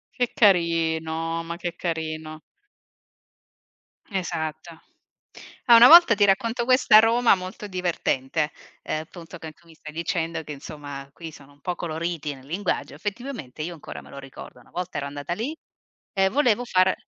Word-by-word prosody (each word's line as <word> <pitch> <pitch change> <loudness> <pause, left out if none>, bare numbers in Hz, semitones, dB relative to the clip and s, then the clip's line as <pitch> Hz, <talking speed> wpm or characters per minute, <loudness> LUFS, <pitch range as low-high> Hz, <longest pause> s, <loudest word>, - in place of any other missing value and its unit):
Che 245 -2 0
carino, 165 -4 +1
ma 170 +1 -6
che 175 -1 -4
carino. 155 -2 -4 1.7
Esatto. 160 -4 -4 0.9
Ah, 240 - +8
una 235 +2 +10
volta 335 -5 +9
ti 205 0 +4
racconto 230 +5 +1
questo 255 -1 +3
a - - +12
Roma 230 +2 +4
molto 185 +2 -8
divertente: 160 -5 -1 0.3
ehm, 155 - -2
appunto, 170 +2 -11
che 160 -1 -8
tu 170 - -28
mi 165 - -16
stai 155 -1 -11
dicendo 165 0 -2
che, 150 - -9
insomma, 140 -1 -8
qui 165 0 -9
sono 145 -1 -16
un 145 - -27
po' 180 - -2
coloriti 165 -2 -4
nel 130 -1 -16
linguaggio, 180 +8 -3
effettivamente 210 - -6
io 175 +2 -5
ancora 160 - -9
me - - -16
lo 140 - -9
ricordo. 135 -2 -11
Una - - -21
volta 180 +1 -5
ero 140 - -3
andata 145 +3 -5
lì 240 - -4 0.6
e 190 0 +3
volevo 245 -2 +2
far 185 -4 +3
170 Hz, 160 wpm, -24 LUFS, 155-200 Hz, 1.7 s, a